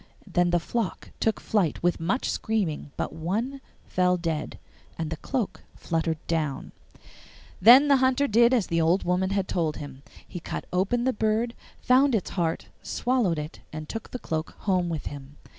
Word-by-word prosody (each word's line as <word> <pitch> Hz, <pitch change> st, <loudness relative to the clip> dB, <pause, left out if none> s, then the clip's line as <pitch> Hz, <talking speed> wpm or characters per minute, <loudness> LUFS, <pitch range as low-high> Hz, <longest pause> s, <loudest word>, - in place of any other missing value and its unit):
Then 175 Hz, -1 st, +2 dB
the 175 Hz, 0 st, +3 dB
flock 210 Hz, +1 st, -3 dB
took 220 Hz, -, +1 dB
flight 185 Hz, -10 st, 0 dB
with 175 Hz, 0 st, +2 dB
much 190 Hz, +11 st, 0 dB
screaming, 185 Hz, -10 st, -1 dB
but -, -, -2 dB
one 215 Hz, -, -2 dB, 0.2 s
fell 180 Hz, 0 st, +2 dB
dead, 165 Hz, -3 st, -3 dB, 0.4 s
and 160 Hz, -1 st, -3 dB
the -, -, -1 dB
cloak 220 Hz, -, -3 dB
fluttered 165 Hz, -1 st, -1 dB
down. 155 Hz, -4 st, -2 dB, 0.9 s
Then 250 Hz, +8 st, +9 dB
the 280 Hz, -1 st, +6 dB
Hunter 260 Hz, +2 st, +2 dB
did 235 Hz, +1 st, +5 dB
as 240 Hz, -7 st, +3 dB
the 165 Hz, 0 st, 0 dB
old 170 Hz, +4 st, +3 dB
woman 180 Hz, +1 st, +1 dB
had 195 Hz, -1 st, 0 dB
told 160 Hz, -4 st, -1 dB
him: 140 Hz, -2 st, -8 dB, 0.3 s
he 175 Hz, -, -6 dB
cut -, -, -5 dB
open 200 Hz, +7 st, +1 dB
the 260 Hz, +1 st, +2 dB
bird, 220 Hz, +2 st, 0 dB, 0.3 s
found 260 Hz, +1 st, +4 dB
its 205 Hz, -, -2 dB
heart, 165 Hz, -3 st, -1 dB, 0.2 s
swallowed 240 Hz, -10 st, 0 dB
it, 150 Hz, +1 st, -6 dB
and 155 Hz, 0 st, -6 dB
took 225 Hz, +5 st, -6 dB
the -, -, -5 dB
cloak 160 Hz, -8 st, -4 dB
home 185 Hz, -3 st, +1 dB
with 160 Hz, -3 st, -4 dB
him. 140 Hz, 0 st, -8 dB
180 Hz, 175 wpm, -26 LUFS, 165-235 Hz, 0.9 s, Then